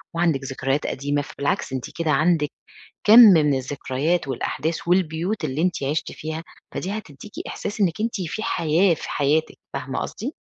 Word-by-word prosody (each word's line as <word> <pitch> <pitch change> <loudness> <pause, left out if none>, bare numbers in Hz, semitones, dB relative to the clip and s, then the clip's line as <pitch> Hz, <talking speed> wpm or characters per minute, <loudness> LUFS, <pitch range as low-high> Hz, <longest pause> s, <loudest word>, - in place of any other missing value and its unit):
وعندِك 165 -5 +1
ذكريات 135 +2 -1
قديمة. 145 +1 -1
فبالعكس 140 -1 -2
أنتِ 130 - -3 0.2
كده 160 -2 +1
عندِك 155 0 +2 0.6
كمْ 220 +3 +9
من 160 - +7
الذكريات 140 +4 -1
والأحداث 155 +6 -3
والبيوت 175 +1 +1
اللي 150 +3 -1
أنتِ 180 -5 0
عِشتِ 150 +3 -2
فيها، 160 +1 -5 0.3
فدي 185 - -3
هتديكِ 190 +2 -12 0.2
إحساس 210 +1 -5
إنِّك 175 -2 +1
أنتِ 225 -2 -1
في 180 +6 -4
حياة 170 -3 +2
في - - -7
حياتِك، 150 +2 +1 0.2
فاهمة - - -4
قصدي؟ - - -5
160 Hz, 155 wpm, -23 LUFS, 145-180 Hz, 0.6 s, كمْ